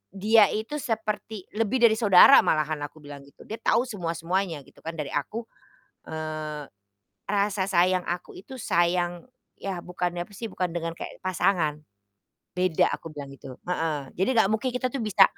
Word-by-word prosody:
"Dia 210 Hz, +2 st, +5 dB
itu 225 Hz, +8 st, -3 dB
seperti 220 Hz, -4 st, -3 dB
lebih 225 Hz, +3 st, 0 dB
dari 220 Hz, -2 st, +6 dB
saudara 200 Hz, -5 st, +8 dB
malahan," 155 Hz, 0 st, +1 dB
aku 155 Hz, +1 st, -19 dB
bilang 145 Hz, -1 st, -9 dB
gitu. 140 Hz, -, -17 dB
"Dia 220 Hz, +1 st, -7 dB
tau 235 Hz, -, +3 dB
semua-semuanya 175 Hz, -, -2 dB
gitu -, -, -21 dB
kan, 165 Hz, -, -6 dB
dari 150 Hz, -4 st, -4 dB
aku, 210 Hz, +11 st, -3 dB, 0.7 s
eee, 155 Hz, -1 st, -4 dB, 0.6 s
rasa 200 Hz, -1 st, +1 dB
sayang 185 Hz, -1 st, +2 dB
aku 175 Hz, 0 st, -4 dB
itu 210 Hz, +7 st, -11 dB
sayang 175 Hz, -6 st, 0 dB, 0.3 s
ya 190 Hz, -3 st, -4 dB
bukan 180 Hz, 0 st, -3 dB
apa 175 Hz, -, -7 dB
sih, 205 Hz, +3 st, -7 dB
bukan 185 Hz, -, -1 dB
dengan 165 Hz, -1 st, -2 dB
kayak -, -, -8 dB
pasangan, 175 Hz, -4 st, +1 dB, 0.7 s
beda," 180 Hz, -3 st, +2 dB
aku -, -, -5 dB
bilang 145 Hz, -3 st, -8 dB
gitu. 135 Hz, -2 st, -10 dB
Heeh. 160 Hz, -6 st, -2 dB
"Jadi 190 Hz, -, +2 dB
gak 220 Hz, -3 st, +4 dB
mungkin 220 Hz, +4 st, 0 dB
kita 255 Hz, 0 st, -1 dB
tuh 275 Hz, -, -3 dB
bisa 210 Hz, -3 st, +5 dB
180 Hz, 165 wpm, -26 LUFS, 160-215 Hz, 0.7 s, saudara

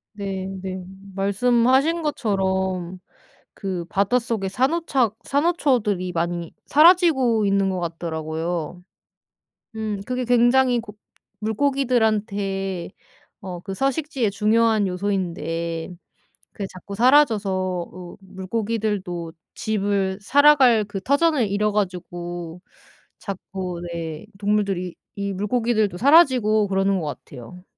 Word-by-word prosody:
네네 190 Hz, -2 st, -5 dB, 0.3 s
말씀하신 250 Hz, -, +2 dB
것처럼 190 Hz, -, -1 dB, 0.5 s
그 185 Hz, -4 st, -4 dB
바닷속에 205 Hz, +2 st, 0 dB
산호차 265 Hz, -, +1 dB
산호초들이 255 Hz, -, +1 dB
많이 170 Hz, 0 st, -3 dB
사라지고 300 Hz, -, +5 dB
있는 195 Hz, -1 st, +2 dB
것 185 Hz, -1 st, -2 dB
같더라고요. 165 Hz, 0 st, -4 dB, 0.9 s
음 215 Hz, -2 st, -3 dB
그게 250 Hz, 0 st, -2 dB
굉장히 245 Hz, +1 st, +4 dB
고 210 Hz, -2 st, -10 dB, 0.4 s
물고기들한테 215 Hz, -6 st, 0 dB, 0.5 s
어 180 Hz, -2 st, -6 dB
그 195 Hz, +1 st, -6 dB
서식지에 270 Hz, -, -1 dB
중요한 215 Hz, 0 st, +2 dB
요소인데 170 Hz, -3 st, -3 dB, 0.6 s
그게 200 Hz, -, -5 dB
자꾸 190 Hz, +2 st, -9 dB
사라져서 190 Hz, -, +1 dB
으 -, -, -18 dB
물고기들도 190 Hz, -3 st, -3 dB, 0.2 s
집을 200 Hz, -2 st, -1 dB
살아갈 270 Hz, -2 st, +5 dB
그 205 Hz, -1 st, -6 dB
터전을 280 Hz, -, +2 dB
잃어 210 Hz, +2 st, 0 dB
가지고 175 Hz, -3 st, -4 dB, 0.6 s
자꾸 185 Hz, -3 st, -6 dB
네 165 Hz, -1 st, -5 dB
동물들이 200 Hz, -4 st, -1 dB, 0.2 s
이 200 Hz, -1 st, -3 dB
물고기들도 215 Hz, 0 st, 0 dB
사라지고 250 Hz, -, +5 dB
그러는 195 Hz, 0 st, +1 dB
것 160 Hz, -, -4 dB
같아요. 145 Hz, +5 st, -9 dB
200 Hz, 245 characters per minute, -23 LUFS, 185-240 Hz, 0.9 s, 사라지고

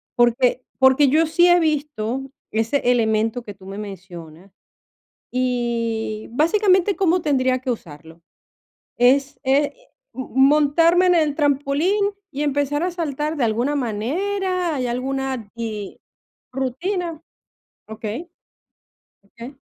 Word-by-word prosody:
porque 245 Hz, +1 st, +2 dB, 0.2 s
porque 265 Hz, +2 st, +5 dB
yo 315 Hz, +4 st, +3 dB
sí 345 Hz, +3 st, +4 dB
he 350 Hz, -, +6 dB
visto 280 Hz, -5 st, -2 dB, 0.2 s
ese 225 Hz, +4 st, +1 dB
elemento 225 Hz, 0 st, +1 dB
que 205 Hz, -3 st, -8 dB
tú 190 Hz, -1 st, -17 dB
me 195 Hz, +1 st, -7 dB
mencionas, 180 Hz, -3 st, -10 dB, 0.8 s
y 235 Hz, -3 st, -2 dB
básicamente, 375 Hz, -, +3 dB
¿cómo 365 Hz, -2 st, +2 dB
tendría 260 Hz, -4 st, +1 dB
que 255 Hz, -, -3 dB
usarlo? 160 Hz, -6 st, -8 dB, 0.8 s
¿Es 275 Hz, +4 st, +3 dB
e, 270 Hz, +2 st, +3 dB, 0.5 s
m 260 Hz, -, -5 dB
montarme 300 Hz, +6 st, +4 dB
en 360 Hz, -, +4 dB
el 310 Hz, -4 st, +2 dB
trampolín 295 Hz, +8 st, +1 dB, 0.2 s
y 290 Hz, +1 st, -4 dB
empezar 285 Hz, +1 st, 0 dB
a 360 Hz, -, 0 dB
saltar 305 Hz, -3 st, -3 dB
de 270 Hz, -, +1 dB
alguna 240 Hz, +6 st, 0 dB
manera? 350 Hz, -, -1 dB
¿Hay 255 Hz, -2 st, -1 dB
alguna 260 Hz, -2 st, -3 dB
di 220 Hz, -4 st, -6 dB, 0.5 s
rutina? 330 Hz, +6 st, -3 dB, 0.7 s
Okey. 220 Hz, +9 st, -6 dB, 1.0 s
Okey. 235 Hz, +7 st, -11 dB
265 Hz, 115 wpm, -21 LUFS, 230-310 Hz, 1.0 s, he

